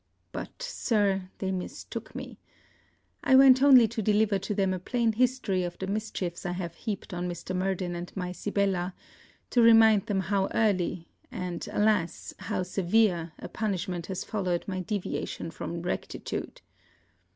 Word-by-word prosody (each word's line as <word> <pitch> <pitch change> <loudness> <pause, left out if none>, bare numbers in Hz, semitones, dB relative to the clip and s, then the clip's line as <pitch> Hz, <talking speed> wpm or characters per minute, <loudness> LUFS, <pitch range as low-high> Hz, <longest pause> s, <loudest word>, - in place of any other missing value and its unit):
But, - - -7
Sir, 205 - 0
they 190 -1 -2
mistook 185 -1 -6
me. - - -7 0.8
I 265 - +5
went 260 -1 +8
only 260 -5 +8
to 225 0 -3
deliver 210 -1 +2
to 205 +2 -3
them 195 -2 +1
a 185 - -3
plain 230 +5 +1
history 245 -5 +1
of 175 -1 -4
the 190 - -4
mischiefs 200 -4 -3
I 175 -2 -2
have 175 -2 -4
heaped 205 +1 -5
on 180 0 -2
Mr. 175 +1 -5
Murden 185 -1 -1
and 175 +1 -6
my 180 -1 -2
Sibella, 190 -2 -1 0.6
to 245 - +4
remind 225 -3 +6
them 195 -2 +1
how 195 +1 +1
early, 185 -6 +1 0.2
and, 180 -1 -5
alas! 210 -5 +1
how - - -2
severe 180 -2 +1
a - - -7
punishment 185 -5 -3
has 190 -2 -3
followed 185 -5 -1
my 185 -2 -2
deviation 185 -3 -3
from 170 0 -5
rectitude. - - -4
195 Hz, 150 wpm, -28 LUFS, 180-220 Hz, 0.8 s, went